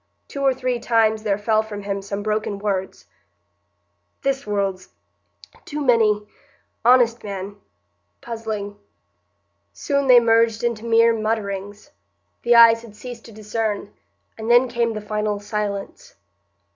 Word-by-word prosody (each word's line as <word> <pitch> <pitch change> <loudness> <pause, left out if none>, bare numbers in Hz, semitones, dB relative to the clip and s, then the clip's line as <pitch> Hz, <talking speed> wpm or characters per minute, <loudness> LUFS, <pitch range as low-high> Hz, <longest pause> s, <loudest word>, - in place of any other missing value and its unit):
Two 280 - -6
or 270 -1 +4
three 255 -1 -2
times 220 -2 +2
there 205 -2 0
fell 215 +1 +1
from 210 -2 -8
him 200 0 -3
some 200 +1 -5
broken 215 -1 -2
words,— 195 -2 -3 1.2
"This 270 -3 -1
world's—too 200 +8 -6
many—honest 235 0 +1
man—puzzling——" 205 +1 -8 0.9
Soon 280 -1 -1
they 250 -2 +8
merged 230 0 +2
into 235 -2 -2
mere 230 0 +4
mutterings; 210 +1 -4 0.5
the 240 0 +3
eyes 230 -1 +7
had 225 -3 -14
ceased 240 +1 -10
to 230 - -12
discern; 215 -1 -4 0.5
and 220 +1 -4
then 245 +2 +5
came 235 -1 -1
the 215 - -5
final 210 0 -2
silence. 210 - -5
220 Hz, 120 wpm, -22 LUFS, 205-235 Hz, 1.2 s, they